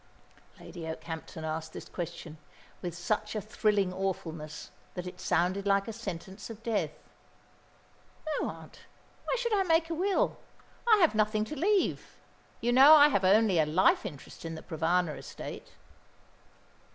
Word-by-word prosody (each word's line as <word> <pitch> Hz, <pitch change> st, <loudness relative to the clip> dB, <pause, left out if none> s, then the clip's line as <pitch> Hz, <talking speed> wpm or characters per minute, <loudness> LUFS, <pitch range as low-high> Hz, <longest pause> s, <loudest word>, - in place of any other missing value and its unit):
Lady 165 Hz, -2 st, -8 dB
Okehampton 160 Hz, 0 st, -6 dB
asked 160 Hz, 0 st, -4 dB
this -, -, -8 dB
question 160 Hz, -2 st, -7 dB, 0.4 s
with 175 Hz, -2 st, -5 dB
such 210 Hz, +5 st, -2 dB
a -, -, 0 dB
thrilling 210 Hz, -3 st, 0 dB
awfulness, 165 Hz, -5 st, -4 dB, 0.2 s
that 180 Hz, -1 st, -4 dB
it 180 Hz, -, -8 dB
sounded 190 Hz, +3 st, +1 dB
like 195 Hz, +1 st, +2 dB
a 225 Hz, -, -4 dB
sentence 195 Hz, -2 st, -7 dB
of 225 Hz, 0 st, -10 dB
death. 230 Hz, -3 st, 0 dB, 1.5 s
"No, -, -, -1 dB
aunt. -, -, -11 dB, 0.5 s
Why -, -, 0 dB
should 470 Hz, -2 st, -1 dB
I 405 Hz, -, +3 dB
make 330 Hz, -2 st, +2 dB
a -, -, +1 dB
will? 375 Hz, +4 st, +1 dB, 0.5 s
I 435 Hz, -, +8 dB
have 335 Hz, -, +5 dB
nothing 215 Hz, 0 st, +1 dB
to 305 Hz, -, -6 dB
leave. 385 Hz, +6 st, 0 dB, 0.4 s
You 240 Hz, -, +1 dB
know 275 Hz, +5 st, +9 dB
I 295 Hz, -1 st, +8 dB
have 200 Hz, -9 st, +1 dB
only 195 Hz, -1 st, +4 dB
a 155 Hz, -, +4 dB
life 170 Hz, +5 st, +3 dB
interest 150 Hz, -9 st, -9 dB
in 165 Hz, 0 st, -5 dB
the 160 Hz, -, -9 dB
Provana 165 Hz, -1 st, 0 dB
estate." -, -, -8 dB
195 Hz, 150 wpm, -30 LUFS, 165-235 Hz, 1.5 s, know